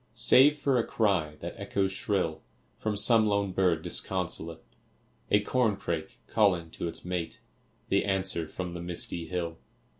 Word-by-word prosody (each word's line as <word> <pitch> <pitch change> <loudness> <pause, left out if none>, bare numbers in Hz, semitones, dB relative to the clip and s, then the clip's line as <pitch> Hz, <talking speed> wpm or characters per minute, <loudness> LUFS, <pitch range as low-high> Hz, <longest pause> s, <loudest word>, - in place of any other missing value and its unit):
Save 130 +5 +6
for 135 -3 +1
a - - +2
cry 95 -11 0
that - - -5
echoes 95 -1 -1
shrill 95 -4 -1 0.4
From 110 -1 -2
some 110 +1 +6
lone 100 -1 0
bird 90 -4 +1
disconsolate; 85 -3 -2 0.7
A 105 - +4
corncrake 100 -10 -1
calling 90 -7 +1
to 85 - -4
its 85 - -6
mate; 90 -2 -4 0.5
The 100 - +2
answer 95 -4 0
from 90 +1 -6
the 85 - -6
misty 85 -1 -4
hill. 85 -2 -4
95 Hz, 145 wpm, -28 LUFS, 85-105 Hz, 0.7 s, Save